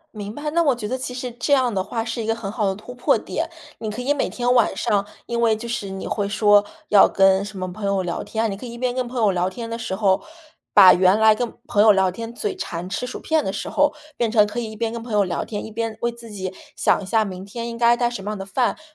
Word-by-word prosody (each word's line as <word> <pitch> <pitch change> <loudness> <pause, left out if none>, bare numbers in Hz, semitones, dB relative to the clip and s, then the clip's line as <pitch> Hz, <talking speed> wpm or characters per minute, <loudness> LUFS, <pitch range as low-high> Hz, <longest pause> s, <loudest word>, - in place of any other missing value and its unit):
明 205 +1 -6
白， 300 +1 -4
那 340 +2 +2
我 285 -6 +3
觉 215 -3 -5
得 255 - -1
其 255 -1 -5
实 250 0 -5
这 240 +5 0
样 255 -4 +3
的 190 - 0
话 225 +4 -3
是 230 +1 -4
一 - - -4
个 225 +1 0
很 215 -4 -5
好 210 -2 0
的 190 - 0
突 215 +5 -10
破 245 0 +2
点。 - - -4 0.3
你 220 - -4
可 215 +4 -5
以 275 +3 +1
每 290 - -1
天 245 0 0
晚 240 -3 +3
上 200 -1 0 0.2
因 235 0 -3
为 230 -2 +3
就 235 +2 -7
是 210 -4 -3
你 190 0 -6
会 205 -1 -1
说 205 0 +4 0.2
要 205 -2 +7
跟 195 0 +3
什 205 -1 -9
么 185 -1 -4
朋 205 +3 -6
友 200 -1 +1
聊 175 -1 -3
天， 220 -1 -2
你 195 - -5
可 230 - -9
以 235 - -7
一 - - -8
边 250 0 -1
跟 255 -1 -2
朋 250 +1 -7
友 210 -2 +4
聊 180 0 0
天 230 +4 -7
的 230 - -3
时 225 -4 -3
候， 195 -2 +2 0.5
把 190 -3 +9
原 185 +2 +4
来 220 0 +6
跟 235 +2 -3
朋 205 - +2
友 215 0 +7
聊 190 -1 +2
天， 230 +5 -7
嘴 410 - -3
馋 175 - -5
吃 225 +6 -3
薯 250 - -7
片 315 -1 +1
的 190 - -2
时 - - -4
候， 290 0 +2 0.2
变 235 - +1
成 215 -2 +5
可 210 +3 -4
以 230 -2 -4
一 - - -10
边 225 +1 -2
跟 230 0 -5
朋 230 -1 -7
友 205 -1 +4
聊 185 - -2
天， 205 -2 -5
一 220 - -9
边 225 0 -3
为 235 - 0
自 235 -1 -13
己 190 -3 -5 0.2
想 - - +2
一 - - -7
下 220 +3 +2
明 190 -2 -7
天 230 +3 -5
应 230 - -6
该 235 0 +5
带 240 0 +1
什 240 -5 -6
么 200 - -5
样 215 - -4
的 195 - -6
饭， 240 +6 0
比 - - -21
220 Hz, 325 characters per minute, -22 LUFS, 200-240 Hz, 0.5 s, 把